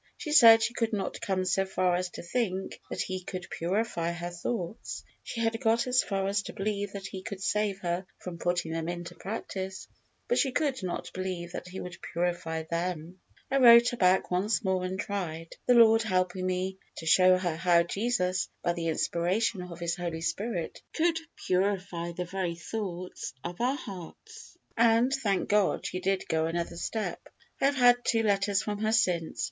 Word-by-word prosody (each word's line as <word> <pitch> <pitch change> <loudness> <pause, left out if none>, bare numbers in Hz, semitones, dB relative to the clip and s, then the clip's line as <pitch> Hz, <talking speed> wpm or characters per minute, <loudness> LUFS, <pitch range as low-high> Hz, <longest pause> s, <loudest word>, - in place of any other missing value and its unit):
She 300 - -5
said 225 -6 +9
she 235 - 0
could 230 -2 -1
not 200 -2 -3
come 185 -1 0
so 195 +1 +2
far 185 -1 +1
as 180 0 -1
to - - -9
think 190 0 -2
that - - -2
He 185 0 -4
could 180 -1 -6
purify 175 -1 -1
her 175 0 -5
thoughts. 175 +3 -4 0.2
She 230 - -5
had 225 +1 0
got 230 -1 +3
as 255 0 +4
far 195 -1 -1
as 200 +1 +1
to - - -8
believe 205 0 -2
that 195 -1 -6
He 190 0 -6
could 200 -1 -6
save 205 0 0
her 175 +1 -2
from 175 -2 -8
putting 175 -2 0
them 165 0 -2
into 175 0 -5
practice, 190 -1 -5 0.4
but 485 - +2
she 270 - +2
could 275 -5 0
not 185 -2 -4
believe 185 -2 -4
that - - -6
He 185 +1 -8
could 180 -1 -6 0.2
purify 170 -2 -1
them. 170 +1 -3 0.3
I 275 - +3
wrote 235 -2 +8
her 245 - -5
back 185 -1 +3
once 195 +6 +1
more, 190 -1 +1
and 185 +1 -4
tried, 170 -6 -4
the 250 - +6
Lord 225 -1 +7
helping 185 -3 0
me, 185 +1 -2 0.2
to 160 - -7
show 185 +3 +6
her 175 -3 -1
how 170 0 +4
Jesus, 185 -2 0
by 175 - +2
the 170 -1 -3
inspiration 180 +6 0
of 175 -1 -8
His 170 0 -1
Holy 170 -2 -4
Spirit, 180 0 -3
could 330 0 +2 0.3
purify 185 -2 0
the 180 +1 -4
very 180 -1 -2
thoughts 180 -2 -5
of 175 +5 -5
our 255 +3 +2
hearts, 225 - -10 0.2
and, 230 +3 +4
thank 210 -9 0
God, 205 -2 +2
she 185 - -3
did 195 +1 -1
go 160 0 +1
another 170 +1 -3
step. 220 +4 -3 0.4
I - - +4
have 285 +1 +3
had 245 -2 +6
two 225 -1 +2
letters 200 -1 +2
from 205 -1 -3
her 215 +1 +1
since. 180 -8 +1
185 Hz, 190 wpm, -29 LUFS, 175-220 Hz, 0.4 s, said